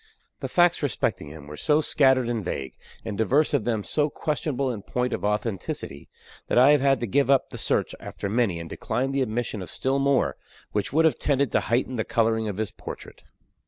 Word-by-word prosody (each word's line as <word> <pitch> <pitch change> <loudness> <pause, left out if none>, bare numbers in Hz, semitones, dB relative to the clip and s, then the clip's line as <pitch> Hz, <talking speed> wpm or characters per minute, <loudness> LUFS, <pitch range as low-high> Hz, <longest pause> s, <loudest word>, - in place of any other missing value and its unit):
The - - -4
facts 175 -1 +3
respecting 125 - -1
him 75 -1 -10
were 75 +1 -9
so 150 - +2
scattered 130 -5 +3
and 115 -3 -2
vague, 70 -7 -4 0.3
and 110 -2 -4
divers 135 +9 +2
of 130 -7 +1
them 110 -4 0
so 150 +6 +1
questionable 140 -4 -2
in 110 -4 -6
point 125 +4 -2
of - - -3
authenticity, 105 - -3 0.4
that - - 0
I 130 +4 +7
have 145 -2 +4
had 135 -1 +3
to - - 0
give 135 +6 +1
up 135 -2 +3
the - - -7
search - - 0
after - - -6
many, 105 -5 +1
and 85 - -7
decline 130 +9 -2
the 135 0 0
admission 115 -3 -2
of 90 - -7
still 135 +1 -1
more, 140 -1 +2 0.3
which 105 -1 -1
would 160 +4 +3
have 160 - +2
tended 140 -3 +1
to - - +3
heighten 125 +2 -1
the 110 - 0
coloring 110 -1 +1
of 100 -2 -4
his 110 -3 -2
portrait. - - -9
120 Hz, 210 wpm, -25 LUFS, 105-140 Hz, 0.4 s, I